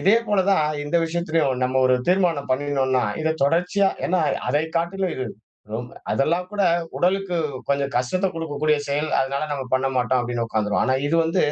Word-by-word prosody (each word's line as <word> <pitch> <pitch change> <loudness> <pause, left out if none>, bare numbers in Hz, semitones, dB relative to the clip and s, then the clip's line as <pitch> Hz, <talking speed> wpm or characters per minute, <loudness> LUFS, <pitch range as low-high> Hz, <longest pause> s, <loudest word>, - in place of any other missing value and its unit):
இதே 205 +4 +5
போல 205 -2 +3
தான் 190 -6 +4 0.2
இந்த 150 +4 0
விஷயத்துலயும் 160 -6 0
நம்ம 130 +1 +1
ஒரு 130 - +4
தீர்மானம் 175 -7 +2
பண்ணினோன்னா 130 -2 +1 0.2
இத 160 0 +1
தொடர்ச்சியா 180 +6 +2 0.2
ஏன்னா 180 -1 +1 0.3
அதைக் 155 +5 0
காட்டிலும் 180 +2 -1
இது 130 - -2 0.5
ரெம் 120 +2 -4 0.2
அதெல்லாம் 170 +6 0
கூட 205 -1 0 0.3
உடலுக்கு 185 0 +1 0.3
கொஞ்சம் 140 0 0
கஷ்டத்தைக் 180 +10 0
குடுக்கக்கூடிய 155 -1 0
செயல். 150 +2 -1
அதனால 135 +2 -1
நம்ம 140 -2 -3
பண்ண 130 +1 +1
மாட்டோம் 125 +1 +2
அப்டின்னு 120 -1 -2
உக்காந்துருவோம். 105 -1 0
ஆனா 130 - +2
இது 165 - 0
வந்து 175 +3 +1
150 Hz, 165 wpm, -23 LUFS, 130-180 Hz, 0.5 s, இதே